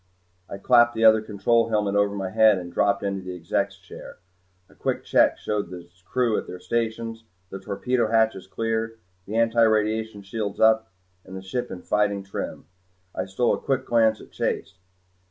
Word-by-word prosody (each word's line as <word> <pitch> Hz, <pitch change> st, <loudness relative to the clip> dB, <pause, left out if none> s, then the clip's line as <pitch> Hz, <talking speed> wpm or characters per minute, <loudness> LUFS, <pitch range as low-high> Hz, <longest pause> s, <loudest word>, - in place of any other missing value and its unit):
I -, -, -6 dB
clapped 120 Hz, +3 st, +4 dB
the 115 Hz, 0 st, +2 dB
other 110 Hz, 0 st, +7 dB
control 110 Hz, +2 st, +1 dB
helmet 105 Hz, -2 st, 0 dB
over 100 Hz, 0 st, +2 dB
my 95 Hz, -2 st, -4 dB
head 110 Hz, -1 st, +5 dB
and 85 Hz, -1 st, -7 dB
dropped 100 Hz, +3 st, +1 dB
into 100 Hz, -1 st, -2 dB
the 90 Hz, 0 st, -6 dB
Exec's 100 Hz, +3 st, -2 dB
chair. 95 Hz, -1 st, -12 dB, 0.5 s
A -, -, -22 dB
quick -, -, -3 dB
check -, -, +3 dB
showed 105 Hz, -4 st, -3 dB
the 90 Hz, -1 st, -9 dB, 0.2 s
crew 115 Hz, +3 st, +1 dB
at -, -, -9 dB
their 90 Hz, -, -8 dB
stations, 115 Hz, +1 st, -3 dB, 0.3 s
the 95 Hz, -, -6 dB
torpedo 110 Hz, +5 st, -1 dB
hatches 110 Hz, -4 st, +1 dB
clear, 115 Hz, +2 st, -2 dB, 0.3 s
the 105 Hz, -, -6 dB
antiradiation 110 Hz, -2 st, +2 dB
shields 100 Hz, 0 st, -4 dB
up 110 Hz, -1 st, +4 dB, 0.3 s
and 95 Hz, -, -9 dB
the -, -, -7 dB
ship 120 Hz, +6 st, -4 dB
in 90 Hz, -, -8 dB
fighting 100 Hz, -1 st, 0 dB
trim. 95 Hz, -, -6 dB, 0.5 s
I -, -, -3 dB
stole 105 Hz, +6 st, +1 dB
a -, -, -2 dB
quick 130 Hz, -1 st, -1 dB
glance 110 Hz, -2 st, +3 dB
at -, -, -14 dB
Chase. -, -, -2 dB
110 Hz, 175 wpm, -24 LUFS, 100-115 Hz, 0.5 s, other